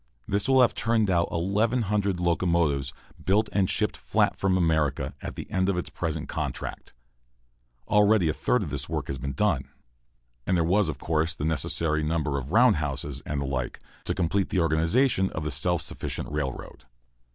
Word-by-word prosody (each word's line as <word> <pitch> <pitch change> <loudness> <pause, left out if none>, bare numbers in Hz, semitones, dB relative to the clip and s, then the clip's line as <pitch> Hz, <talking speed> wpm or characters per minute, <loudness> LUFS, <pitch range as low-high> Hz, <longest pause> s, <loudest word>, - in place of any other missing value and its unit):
This 100 +5 0
will 130 -1 +6
have 120 - +4
turned 110 -3 +1
out 85 -1 +1
1,100 100 +1 0
locomotives, 85 -5 +1 0.3
built 105 +3 +2
and 95 -2 +1
shipped - - 0
flat - - +1
from 95 -1 +1
America, 75 -6 +1
at - - -6
the - - -7
end 95 +1 +1
of 95 - 0
its 90 - -4
present 80 -3 -3
contract. - - -5 0.9
Already 105 -3 +4
a 80 - +1
third 70 -3 +1
of - - -6
this - - -4
work - - -2
has 65 - -4
been 70 +2 -4
done. - - 0 0.8
And 95 - +2
there 85 - +2
were, 90 +5 +3
of 70 - -4
course, 80 +2 0
the 75 - -3
necessary 80 0 0
number 75 -3 0
of 65 - -7
roundhouses, 75 - +2
and 75 -1 -2
the 70 - -2
like, 65 -2 -3 0.3
to - - -1
complete 95 +2 0
the 95 - 0
organization 90 - +2
of 80 - -3
the 75 - -2
self 85 +5 0
sufficient - - -5
railroad. 75 -3 -5
85 Hz, 175 wpm, -26 LUFS, 75-100 Hz, 0.9 s, will